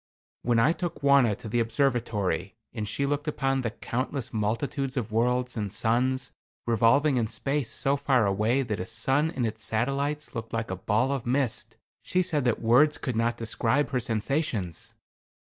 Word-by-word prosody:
When 120 -1 +1
I 115 +8 +4
took 175 -4 -5
Wauna 140 -6 +5
to 110 - -9
the 120 +3 0
observatory, 115 - 0 0.2
and 110 -3 -4
she 140 +6 -1
looked 145 +2 -2
upon 135 -2 0
the 115 - -1
countless 130 +4 -4
multitudes 130 +6 -1
of 115 -3 -2
worlds 125 +2 +1
and 105 -4 -3
suns 125 +5 +1 0.3
revolving 125 +5 +3
in 115 -2 +1
space 135 +4 -2
so 140 0 +1
far 130 -5 +2
away 105 +7 +1
that 110 -5 -3
a 90 - -3
sun 135 +7 +1
and 130 -6 -2
its 110 0 -4
satellites 140 +6 -1
looked 115 -2 -6
like 115 -3 -2
a - - -1
ball 110 +8 +1
of 135 -4 -3
mist, 120 -4 -1 0.2
she 185 0 +1
said 150 -6 0
that 120 - +1
words 140 +7 +5
could 125 -4 -3
not 115 +1 +1
describe 115 +4 0
her 130 - +1
sensations. 115 - -2
120 Hz, 175 wpm, -27 LUFS, 110-140 Hz, 0.3 s, Wauna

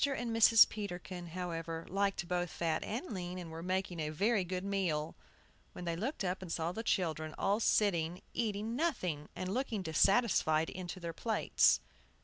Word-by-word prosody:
and 245 -5 0
Mrs. 225 0 +8
Peterkin, 180 -4 -6
however, 165 -1 -4
liked 195 -2 0
both 175 0 -1
fat 160 -1 -1
and 245 - -4
lean, 180 -1 -4
and 175 -3 -7
were 165 +1 -6
making 185 -1 -2
a 155 -1 -1
very 200 +6 +2
good 180 +1 -3
meal, 180 -6 -1 0.6
when 180 - -7
they 170 -1 -1
looked 225 - -3
up 185 0 -2
and 180 -3 -7
saw 165 +1 -1
the 220 - -4
children 160 -7 -1
all 200 +2 +1
sitting 180 -6 +2
eating 220 0 -1
nothing, 185 - -1
and 185 +1 -3
looking 235 -6 -1
dissatisfied 160 -2 +3
into 185 0 -6
their 170 -1 -5
plates. 220 +6 +3
180 Hz, 165 wpm, -34 LUFS, 165-210 Hz, 0.6 s, Mrs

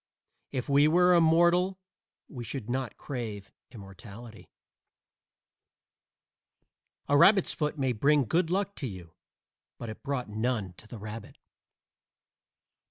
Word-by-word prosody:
If 130 -3 -3
we 145 +1 +4
were 180 +3 +4
immortal 175 +3 +3 0.5
we 125 -6 -8
should 120 0 -6
not 130 -1 -3
crave 110 -7 -6 0.2
immortality. 110 +1 -12 2.6
A 145 - +2
rabbit's 195 +6 +5
foot 150 0 -2
may 135 -2 0
bring 140 +5 +3
good 165 - +1
luck 200 +2 -1
to 135 - -4
you, 90 -6 -10 0.6
but 115 - -7
it 110 - -9
brought 140 -3 -3
none 110 -3 -2
to 110 - -14
the 115 - -9
rabbit. 105 +1 -9
130 Hz, 115 wpm, -28 LUFS, 110-160 Hz, 2.6 s, rabbit's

